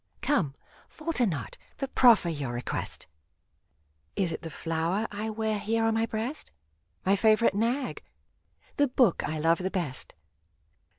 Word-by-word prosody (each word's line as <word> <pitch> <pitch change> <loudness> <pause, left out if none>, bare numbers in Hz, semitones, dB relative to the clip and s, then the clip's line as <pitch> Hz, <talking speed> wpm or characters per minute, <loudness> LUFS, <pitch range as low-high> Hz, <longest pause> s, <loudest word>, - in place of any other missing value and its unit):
Come; 170 - +1 0.3
falter 310 -7 -1
not, 145 - -4 0.2
but 275 -2 -4
proffer 235 -8 +6
your 145 -6 -3
request! 120 +1 -4 1.1
Is 185 -4 0
it - - -5
the 165 - -6
flower 165 +7 -1
I 210 +2 -3
wear 220 -1 -1
here 225 +2 0
on 225 0 +2
my 225 +1 +1
breast? 230 +8 -4 0.5
My 195 +1 +4
favorite 215 0 +4
nag? 240 +6 -1 0.7
The 285 - +4
book 250 -7 +3
I 155 - -2
love 165 +2 +2
the 185 +1 -1
best 170 -10 -4
210 Hz, 140 wpm, -28 LUFS, 165-230 Hz, 1.1 s, proffer